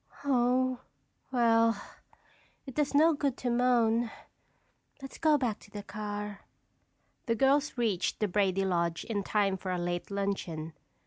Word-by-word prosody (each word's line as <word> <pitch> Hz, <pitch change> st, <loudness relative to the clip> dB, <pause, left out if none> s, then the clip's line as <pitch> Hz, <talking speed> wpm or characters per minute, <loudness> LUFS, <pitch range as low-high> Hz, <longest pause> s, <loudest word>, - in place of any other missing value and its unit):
"Oh, 255 Hz, -1 st, +2 dB, 0.5 s
well, 230 Hz, -3 st, +3 dB, 0.9 s
it 265 Hz, -, -8 dB
does 290 Hz, 0 st, 0 dB
no 320 Hz, +3 st, +6 dB
good 280 Hz, -3 st, -1 dB
to 245 Hz, -, -2 dB
moan. 235 Hz, -1 st, +2 dB, 0.9 s
Let's 270 Hz, -1 st, -10 dB
go 310 Hz, -2 st, +4 dB
back 245 Hz, -6 st, -1 dB
to -, -, -17 dB
the 205 Hz, 0 st, -7 dB
car." 210 Hz, 0 st, -5 dB, 0.9 s
The 230 Hz, -, +2 dB
girls 275 Hz, +4 st, +2 dB
reached 215 Hz, -7 st, 0 dB
the 210 Hz, -, +1 dB
Brady 195 Hz, 0 st, +1 dB
lodge 170 Hz, -2 st, 0 dB
in 215 Hz, -3 st, -2 dB
time 200 Hz, -1 st, +1 dB
for 185 Hz, -, -6 dB
a 180 Hz, -, 0 dB
late 175 Hz, 0 st, -3 dB
luncheon. 190 Hz, -6 st, -3 dB
225 Hz, 140 wpm, -30 LUFS, 195-255 Hz, 0.9 s, no